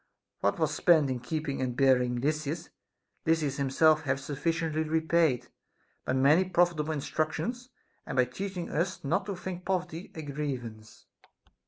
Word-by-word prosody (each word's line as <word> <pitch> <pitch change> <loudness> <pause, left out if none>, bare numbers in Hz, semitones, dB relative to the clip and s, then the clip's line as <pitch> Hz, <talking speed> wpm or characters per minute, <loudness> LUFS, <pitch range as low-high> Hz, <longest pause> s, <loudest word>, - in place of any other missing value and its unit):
What 100 - +1
was 155 -2 +1
spent 155 -5 +4
in 125 - -2
keeping 150 +1 -3
and 125 -2 -1
burying 125 -3 +3
Lysis, 155 +3 -2 0.5
Lysis 160 -4 +1
himself 155 +3 +4
hath 135 -3 -1
sufficiently 155 +3 -1
repaid, 160 -5 +1 0.6
by - - 0
many 140 +7 +5
profitable 175 -4 +1
instructions, 155 - -2 0.4
and 140 - -4
by 130 -1 +4
teaching 180 +7 -5
us 175 +4 -1
not 190 +8 0
to 200 - -3
think 180 0 -6
poverty 180 -2 -3
a 160 - -5
grievance. 130 -7 -6
155 Hz, 140 wpm, -29 LUFS, 135-170 Hz, 0.6 s, many